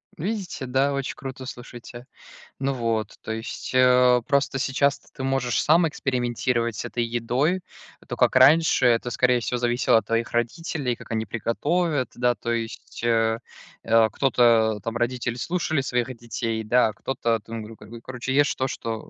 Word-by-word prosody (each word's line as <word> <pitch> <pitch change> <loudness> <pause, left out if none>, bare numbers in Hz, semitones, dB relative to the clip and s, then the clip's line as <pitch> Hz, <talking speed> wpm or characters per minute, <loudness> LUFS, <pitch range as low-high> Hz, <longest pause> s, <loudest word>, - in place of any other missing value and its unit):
Видите? 190 -4 -4
Да, 135 +2 +1
очень 140 -1 -3
круто, 130 -1 -8
слушайте. 120 0 -10 0.5
Ну 135 0 0
вот, 115 -4 -2
то 110 - -6
есть, 110 +1 -5
а, 125 -1 +5
просто 140 -2 +1
сейчас 140 +1 +1
то - - -27
ты 130 - -7
можешь 130 -3 0
сам 165 +2 +4
экспериментировать 120 -4 -1
с - - -5
этой 120 0 -2
едой. 120 +10 0 0.5
То, - - -4
как - - +3
раньше, 145 +3 +5
это, 120 0 +3
скорее 125 0 +2
всего, 125 +1 -2
зависело 120 -1 +2
от 110 - -1
твоих 115 0 -1
родителей, 130 +2 -2
как - - -13
они 110 0 -1
приготовят, 145 - -1
да, 120 0 +1
то 115 +2 -4
есть, 115 -1 -5
а, 115 -1 +2 0.4
а, 115 0 +4
кто-то, 115 -3 +3
там, 115 +1 -3
родители, 120 0 -1
слушали 155 +1 -1
своих 125 0 -2
детей, 115 -1 -4
да, 120 +2 +3
а 110 - -7
кто-то 115 -1 -1
там 115 +1 -7
говорил: 110 +1 -11
"Короче, 130 +1 -4
ешь 145 0 +3
то, 130 - -1
что 115 -3 -5
120 Hz, 165 wpm, -24 LUFS, 115-135 Hz, 0.5 s, а